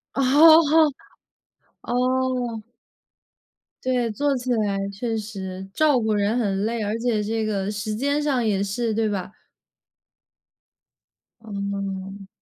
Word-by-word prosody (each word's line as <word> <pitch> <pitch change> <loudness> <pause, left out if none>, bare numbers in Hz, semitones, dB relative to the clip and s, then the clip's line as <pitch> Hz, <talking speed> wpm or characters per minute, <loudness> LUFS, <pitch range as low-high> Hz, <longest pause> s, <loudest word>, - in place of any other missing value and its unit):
哦 275 - +1 0.2
哦。 315 -1 +7 1.0
哦。 250 -3 -1 1.2
对， 250 -2 0
做 280 +5 0
起 250 +1 -6
来 205 -3 0
确 225 +3 -3
实。 190 -3 -6
照 300 -4 +3
顾 220 -2 0
人 205 +3 +1
很 200 -3 0
累， 230 +1 -1
而 210 +2 -2
且 230 -2 0
这 220 +1 -2
个 200 -2 -2
时 210 +1 -3
间 285 +6 0
上 265 -5 +1
也 200 -2 +1
是， 220 +3 -2
对 220 0 0
吧？ 195 -1 -4 2.1
嗯。 200 -2 -5
220 Hz, 125 characters per minute, -23 LUFS, 200-250 Hz, 2.1 s, 哦